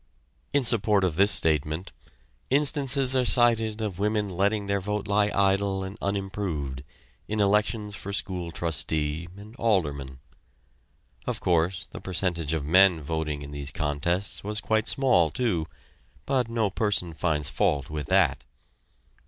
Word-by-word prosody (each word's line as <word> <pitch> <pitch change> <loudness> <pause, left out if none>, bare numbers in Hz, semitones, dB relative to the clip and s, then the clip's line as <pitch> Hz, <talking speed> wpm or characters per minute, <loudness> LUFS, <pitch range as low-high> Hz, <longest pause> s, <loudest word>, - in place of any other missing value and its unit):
In 145 - +2
support 105 -4 +3
of 90 -4 0
this 100 +4 +4
statement 80 +1 0 0.6
instances 140 -2 +3
are 130 - +3
cited 115 -3 +3
of 100 -4 -4
women 105 0 0
letting 100 +3 0
their 100 0 -1
vote 105 +2 -3
lie 105 0 +2
idle 100 -1 +1
and 95 +1 -6
unimproved 95 -9 -3 0.4
in 110 0 -2
elections 105 +1 +1
for 100 0 -7
school 90 -3 -3
trustee 80 -1 -2
and 105 +3 -12
alderman. 75 - -1 1.1
Of - - -2
course, 85 +1 0
the - - -8
percentage 85 -4 0
of 75 -3 -3
men 90 0 +5
voting 75 -1 -3
in 70 - -9
these 70 -1 -2
contests 85 +5 -1
was 105 +1 -3
quite 110 +1 0
small, 120 - +3
too, 85 - -1 0.6
but 130 -4 0
no 115 -4 0
person 100 -5 0
finds 75 -2 -1
fault 70 +2 0
with 75 -2 -4
that. 75 -9 +2
95 Hz, 140 wpm, -26 LUFS, 80-105 Hz, 1.1 s, men